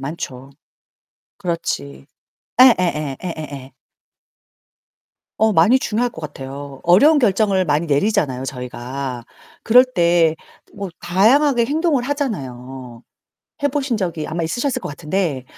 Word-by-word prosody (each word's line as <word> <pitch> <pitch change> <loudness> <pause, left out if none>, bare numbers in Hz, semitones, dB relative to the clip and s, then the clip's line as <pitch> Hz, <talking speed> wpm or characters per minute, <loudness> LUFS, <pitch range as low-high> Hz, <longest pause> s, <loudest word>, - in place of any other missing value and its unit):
많죠. 135 -2 -7 0.9
그렇지. 70 - -4 0.5
예예예 175 - +4
예예예. 145 -6 -7 1.7
어 220 0 +3
많이 205 +9 +5
중요할 240 +1 -1
것 160 - -11
같아요. 140 -1 -8
어려운 280 - +5
결정을 200 -5 +2
많이 150 +2 +1
내리잖아요, 145 -4 0
저희가. 125 0 -6 0.4
그럴 250 +3 +6
때 170 -8 +2 0.4
뭐 200 -1 -5
다양하게 235 +8 +3
행동을 300 0 0
하잖아요. 130 - -5 0.6
해 285 - +4
보신 275 -4 -1
적이 170 -6 -3
아마 165 +1 -3
있으셨을 240 - -1
것 - - -6
같은데 150 -2 -2
170 Hz, 260 characters per minute, -19 LUFS, 135-230 Hz, 1.7 s, 그럴